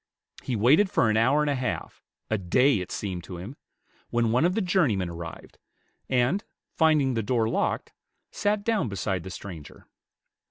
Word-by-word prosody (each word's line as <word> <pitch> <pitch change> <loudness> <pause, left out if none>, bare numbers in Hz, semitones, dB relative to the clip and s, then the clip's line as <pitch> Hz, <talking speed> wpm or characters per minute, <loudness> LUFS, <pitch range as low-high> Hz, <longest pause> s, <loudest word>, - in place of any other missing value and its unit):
He 125 - -3
waited 140 - +4
for 110 - +2
an - - +1
hour 130 +7 +3
and 150 - +1
a - - +2
half, 130 -2 -4 0.3
a 110 - -1
day, 120 +7 +3
it 90 - -6
seemed 90 -4 -4
to 90 - -8
him, 100 +10 -8 0.5
when 115 -1 +1
one 125 +7 +3
of 180 +2 +1
the 225 - +1
journey 180 - +2
men 90 -3 -2
arrived, 85 0 -9 0.5
and, 130 +10 +2 0.3
finding 155 -5 +3
the 115 - 0
door 115 0 +1
locked, - - -1 0.4
sat 205 0 0
down 220 - 0
beside 95 -1 -2
the 95 - -8
stranger. 90 -5 -9
120 Hz, 175 wpm, -26 LUFS, 95-150 Hz, 0.5 s, waited